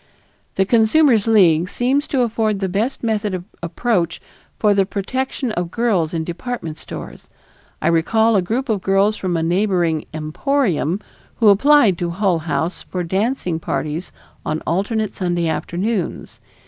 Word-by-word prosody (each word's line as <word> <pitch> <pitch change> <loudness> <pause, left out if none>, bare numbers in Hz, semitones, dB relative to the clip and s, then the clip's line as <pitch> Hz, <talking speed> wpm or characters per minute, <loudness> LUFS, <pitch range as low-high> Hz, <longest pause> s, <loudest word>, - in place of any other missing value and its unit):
The 195 - +2
Consumers' 230 +1 +4
League 180 -6 +4
seems 265 +6 0
to 265 - 0
afford 220 -3 0
the 195 - -1
best 215 +10 -2
method 215 -3 -1
of 180 - -5 0.2
approach 170 -1 -1 0.4
for 210 -2 +3
the 195 -1 +3
protection 255 +6 -3
of 175 -4 -2
girls 190 -7 0
in 165 -2 -2
department 170 -2 -5
stores; - - -9 0.5
I - - +2
recall 220 +7 +3
a 195 - +4
group 235 +9 -2
of 215 -5 0
girls 195 +3 +2
from 185 -4 -2
a 160 - -1
neighboring 175 -3 +1
"emporium" 170 - -1 0.3
who 220 -3 +4
applied 220 - +5
to 175 - -1
Hull 180 -1 +1
House 160 +2 -2
for 180 -1 -4
dancing 190 -1 -1
parties 155 +1 -3 0.3
on 155 +1 -2
alternate 205 +5 -1
Sunday 175 -2 -1
afternoons. 180 +4 -3
195 Hz, 145 wpm, -20 LUFS, 170-225 Hz, 0.5 s, applied